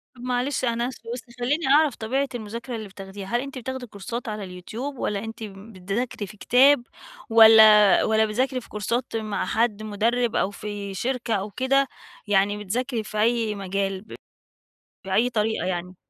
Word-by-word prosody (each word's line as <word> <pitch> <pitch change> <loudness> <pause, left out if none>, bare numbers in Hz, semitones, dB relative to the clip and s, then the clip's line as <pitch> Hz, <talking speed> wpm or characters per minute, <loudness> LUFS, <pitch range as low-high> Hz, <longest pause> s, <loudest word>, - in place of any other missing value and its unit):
طب 240 - -14
معلش 250 +2 -1
أنا 235 +1 0
آسفه، 230 -2 -9
بس 245 - -5 0.2
خلّيني 285 +5 0
أعرف 290 -2 +4
طبيعة 265 +5 -1
المذاكرة 235 +2 -6
اللي 220 -2 -6
بتاخديها، 195 0 -9
هل 240 +2 0
أنتِ 275 0 -7
بتاخدي 255 0 -5
كورسات 230 +5 -6
على 210 -1 -4
اليوتيوب، 220 +10 -7
والّا 205 -3 -2
أنتِ 225 0 -7
بتذاكري 200 +2 -5
في 210 +1 -13
كتاب، 260 +3 +5 0.5
والّا 220 -2 +8
والّا 220 0 +3
بتذاكري 255 +4 -1
في - - -17
كورسات 230 +4 -2
مع 215 -2 -2
حد 220 -2 0
مُدرِّب، 230 +3 0
أو 195 - +1
في 205 -1 -6
شركة 240 +2 -2
أو 205 +1 -2
كده، 270 +4 +2 0.4
يعني 205 0 +2
بتذاكري 235 +3 -2
في 215 0 -7
أي 225 -2 +1
مجال 195 0 -2
ب 220 - -11 0.9
بأي 215 +6 +1
طريقة 220 -2 0
يعني؟ 180 0 -4
220 Hz, 165 wpm, -24 LUFS, 205-245 Hz, 0.9 s, والّا